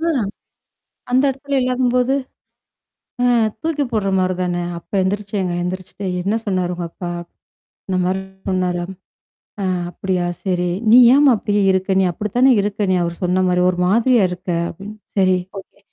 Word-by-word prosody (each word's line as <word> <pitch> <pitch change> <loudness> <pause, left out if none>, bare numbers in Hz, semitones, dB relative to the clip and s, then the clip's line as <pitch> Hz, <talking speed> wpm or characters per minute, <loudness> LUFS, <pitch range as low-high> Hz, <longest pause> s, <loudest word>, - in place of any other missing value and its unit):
அ. 325 - -2 1.1
அந்த 255 +2 +4
இடத்துல 275 +1 -2
இல்லாதம்போது? 250 0 +1 1.1
அ - - +3 0.4
தூக்கி 315 -3 0
போடுற 210 -3 0
மாரி 185 0 +1
தான. 180 -1 -1 0.2
அப்ப 170 - -20
எந்திரிச்சேங்க 195 -1 -2
எந்திரிச்சுட்டு 185 +2 -5 0.2
"என்ன 200 +4 0
சொன்னாரு 185 -3 -1
உங்க 175 0 -5
அப்பா?" 175 +1 -7 0.8
"இந்தமாரி 185 0 0 0.3
சொன்னாரா" 180 -2 0 0.8
"அ - - -1 0.3
அப்படியா? 185 -1 -2 0.2
சரி." 180 -2 0 0.2
"நீ 240 - +9 0.2
ஏமா 285 -1 +6
அப்படியியே 205 0 0
இருக்க 190 0 +1
நீ 190 - +3
அப்படித்தானே 240 +8 +2
இருக்க 205 0 -1
நீ - - +3
அவரு 170 0 -3
சொன்ன 180 +1 +2
மாரி, 180 0 +2
ஒரு 180 -1 -2
மாதிரியா 230 +3 +3
இருக்க." 180 +1 -7 0.2
அப்படின்னு 205 +5 -9 0.2
"சரி 185 -1 +4 0.2
ஓகே. 195 - -17
190 Hz, 145 wpm, -19 LUFS, 180-225 Hz, 1.1 s, நீ